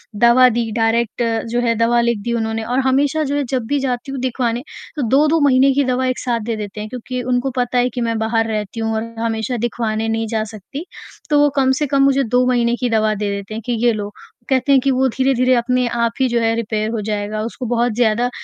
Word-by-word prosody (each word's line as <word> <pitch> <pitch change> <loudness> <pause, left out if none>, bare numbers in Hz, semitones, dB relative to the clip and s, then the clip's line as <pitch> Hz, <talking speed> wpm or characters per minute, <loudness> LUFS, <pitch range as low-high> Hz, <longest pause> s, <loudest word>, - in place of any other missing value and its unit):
दवा 235 +4 +6
दी 230 -1 -1
डायरेक्ट 230 +1 0 0.3
जो 240 - +1
है 230 -1 +1
दवा 230 +1 +2
लिख 235 -2 0
दी 235 - -2
उन्होंने 225 -1 -2
और 245 +3 -1
हमेशा 285 +4 +2
जो 285 -1 -2
है 290 - 0
जब 255 -3 -1
भी 285 +3 0
जाती 260 0 -3
हूँ 270 - -4
दिखवाने 245 -2 -1 0.3
तो 300 - -2
2-2 305 +5 +3
महीने 265 0 +4
की 285 +1 +2
दवा 255 0 0
एक 255 - -1
साथ 240 -2 -1
देते 215 -2 -5
हैं, 210 +1 -5
क्योंकि 250 +1 -5
उनको 250 +2 0
पता 245 0 0
है 245 0 +3
कि 245 0 -5
मैं 230 -1 -1
बाहर 225 0 0
रहती 215 0 -4
हूँ 225 0 -1
और 220 - -1 0.2
हमेशा 225 +1 -2
दिखवाने 225 -1 -2
नहीं 225 0 -1
जा 220 0 -1
सकती। 275 - -8 0.4
तो 295 -1 +4
वो 290 - +4
कम 265 -2 +3
से 295 - +1
कम 275 0 +2
मुझे 275 0 +3
2 250 +1 +2
महीने 240 -1 +2
की 250 - 0
दवा 215 -1 +2
दे 205 0 -2
देते 200 +1 -7
हैं 220 - -5
कि 245 - -1
ये 240 - +5
लो, 205 -1 -4 0.4
कहते 265 +1 +2
हैं 275 - +6
कि 275 - +1
वो 265 0 +2
धीरे-धीरे 255 0 +2
अपने 250 +1 +1
आप 235 -1 0
ही 260 - +4
जो 235 0 +1
है 225 0 +1
रिपेयर 215 -1 -2
हो 225 -2 -2
जाएगा। 210 0 -3
उसको 235 +3 -5
बहुत 240 0 0
ज़्यादा 240 +1 +2
240 Hz, 240 wpm, -19 LUFS, 225-255 Hz, 0.4 s, दवा